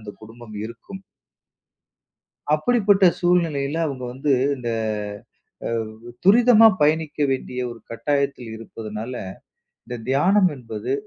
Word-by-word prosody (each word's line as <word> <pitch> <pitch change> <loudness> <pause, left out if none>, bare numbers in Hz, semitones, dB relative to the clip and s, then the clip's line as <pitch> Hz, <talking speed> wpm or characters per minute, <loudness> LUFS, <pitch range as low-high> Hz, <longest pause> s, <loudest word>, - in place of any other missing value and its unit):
அந்தக் 105 -2 -11
குடும்பம் 115 0 -12
இருக்கும். 115 - -9 1.5
அப்படிப்பட்ட 200 +2 +3
சூழ்நிலையில 165 -5 +1
அவுங்க 135 -4 -4
வந்து, 135 +3 -1 0.2
இந்த 125 -2 -5 1.0
அவ் 115 -2 -2 0.3
துரிதமா 225 +2 +7
பயணிக்க 155 0 +1
வேண்டிய 125 -1 -3
ஒரு 120 - -11
கட்டாயத்தில் 140 -1 -1
இருப்பதுனால, 110 +1 -7 0.7
இந்த 120 0 -5
தியானம் 185 +8 +4
என்பது 115 0 -5
140 Hz, 100 wpm, -22 LUFS, 115-175 Hz, 1.5 s, துரிதமா